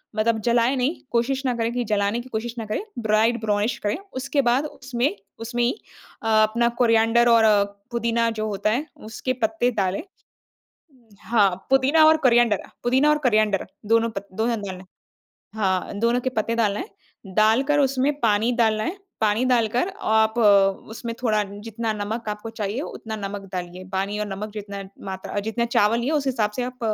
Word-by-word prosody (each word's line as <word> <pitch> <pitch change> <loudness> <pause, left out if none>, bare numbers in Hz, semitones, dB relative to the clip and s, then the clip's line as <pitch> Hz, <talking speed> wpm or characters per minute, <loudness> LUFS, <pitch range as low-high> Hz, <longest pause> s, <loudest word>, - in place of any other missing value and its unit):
मतलब 220 +1 +1
जलाए 240 +2 +3
नहीं, 265 +6 0 0.2
कोशिश 260 +3 0
ना 250 - +1
करें 230 0 -1
कि 245 0 -1
जलाने 205 0 0
की 255 - -13
कोशिश 230 0 -4
ना 225 - -4
करें, 215 - -3 0.2
ब्राइट 220 +2 +2
ब्राउनिश 210 +1 0
करें। 205 0 0 0.2
उसके 280 +2 0
बाद 250 +3 +2
उसमें 255 -5 -2 0.2
उसमें 240 +1 -2
ही 240 - +3 0.5
अ, 225 - -2 0.2
अपना 235 +2 +2
कोरिएंडर 230 +1 +4
और 230 -1 +5 0.5
पुदीना 235 0 +1
जो 215 - -1
होता 210 0 -1
है 265 +8 -1 0.3
उसके 255 +3 -2
पत्ते 220 +3 +1
डालें। 195 -4 -1 1.2
हाँ, 205 -5 +2
पुदीना 270 +4 +5
और 315 0 +6
कोरिएंडर 240 -7 +3 0.2
पुदीना 260 +5 +3
और 300 - +4
कोरिएंडर, 215 -3 +2 0.2
दोनों 230 +1 +3
पत 200 -2 -7
दोनों 225 +2 0
डालें। 190 -2 -7 0.7
हाँ, 190 -4 0
दोनों 235 +2 +2
के 260 - -1
पत्ते 230 -2 -1
डालना 210 -3 +1
है। 410 - -6 0.5
डालकर 255 +7 +3
उसमें 270 0 +2
पानी 220 +1 +2
डालना 220 -3 +2
है, 345 +5 -3 0.2
पानी 215 +2 +2
डालकर 245 - +2
आप 220 - +2
उसमें 210 +2 +2
थोड़ा 215 -4 +2 0.2
जितना 225 0 -3
नमक 215 +2 -4
आपको 210 +2 -5
चाहिए 215 +3 -3
उतना 220 -7 -6
नमक 200 -1 -5
डालिए, 180 0 -6
पानी 195 +2 -1
और 210 - -1
नमक 200 +2 -5
जितना 200 -2 -6 0.2
मात्रा 190 +1 -4
जितने 220 +3 -1
चावल 230 -1 +2
लिए 250 +5 -1
उस 295 -3 0
हिसाब 225 -5 0
से 250 - -1
आप 250 0 -6
225 Hz, 170 wpm, -23 LUFS, 210-245 Hz, 1.2 s, और